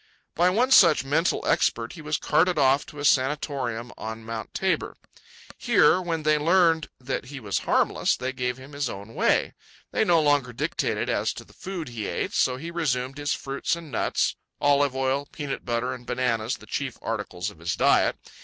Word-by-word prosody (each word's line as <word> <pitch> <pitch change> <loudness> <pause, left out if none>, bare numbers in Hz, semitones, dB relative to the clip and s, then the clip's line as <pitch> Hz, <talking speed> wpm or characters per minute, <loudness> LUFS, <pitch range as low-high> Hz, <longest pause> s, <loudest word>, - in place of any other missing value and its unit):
By 175 +2 +3
one 240 +8 +2
such 170 - +7
mental 160 +6 +1
expert 115 0 +1
he 170 - -10
was 150 0 -1
carted 180 +1 +2
off 135 0 +3
to 150 - -12
a 145 - -3
sanatorium 130 -4 0
on 110 0 -6
Mt. 115 -1 -6
Tabor. - - -1 0.6
Here, 180 - +4
when 165 -3 -3
they 155 0 +3
learned 165 0 +3
that 130 0 -4
he 140 +1 -8
was 105 -5 -2
harmless, - - +2
they 130 +1 -3
gave 125 -1 -2
him 130 +2 -12
his 140 -3 -2
own 100 +2 -8
way. - - +2 0.4
They - - +2
no 170 -2 +4
longer 145 -5 +2
dictated - - -1
as - - 0
to - - -9
the - - -21
food 180 -6 -6
he 115 -4 -5
ate, - - -3
so 125 -1 +2
he 165 +5 -6
resumed 135 -5 -1
his 145 0 0
fruits 135 +4 -2
and 165 -3 -10
nuts—olive 145 0 0
oil, 135 +2 0
peanut 145 -3 -5
butter, 120 +1 -1
and 125 -1 -9
bananas 120 0 -1
the - - -15
chief 135 -3 -4
articles 105 -3 -3
of 85 - -18
his 85 +1 -2
diet. - - +3
135 Hz, 185 wpm, -25 LUFS, 120-155 Hz, 0.6 s, such